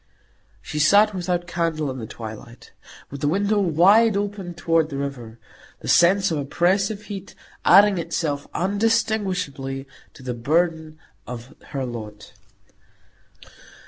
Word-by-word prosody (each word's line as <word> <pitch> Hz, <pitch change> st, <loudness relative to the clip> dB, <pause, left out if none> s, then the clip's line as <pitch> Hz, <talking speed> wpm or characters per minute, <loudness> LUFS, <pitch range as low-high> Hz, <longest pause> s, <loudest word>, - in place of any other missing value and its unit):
She 150 Hz, -, -5 dB
sat 205 Hz, +7 st, +5 dB
without 180 Hz, -1 st, -2 dB
candle 165 Hz, -4 st, -2 dB
in 130 Hz, -, -7 dB
the 110 Hz, -, -6 dB
twilight, 115 Hz, +2 st, -10 dB, 0.4 s
with 140 Hz, -1 st, -7 dB
the 145 Hz, -, +1 dB
window 200 Hz, +6 st, +1 dB
wide 200 Hz, +5 st, +4 dB
open 200 Hz, -3 st, -4 dB
toward 165 Hz, -2 st, +1 dB
the 140 Hz, -, -5 dB
river; 125 Hz, -5 st, -6 dB, 0.4 s
the -, -, -8 dB
sense 190 Hz, +2 st, +4 dB
of 155 Hz, -, -1 dB
oppressive 190 Hz, +8 st, 0 dB
heat 200 Hz, -2 st, -8 dB, 0.3 s
adding 200 Hz, 0 st, +6 dB
itself 160 Hz, -3 st, -2 dB
undistinguishably 190 Hz, -10 st, -1 dB, 0.3 s
to 130 Hz, -, -14 dB
the 125 Hz, -1 st, -3 dB
burthen 160 Hz, +5 st, 0 dB, 0.3 s
of 125 Hz, +3 st, -8 dB
her 135 Hz, -2 st, -3 dB
lot. 110 Hz, -4 st, -8 dB
165 Hz, 125 wpm, -23 LUFS, 135-195 Hz, 0.4 s, adding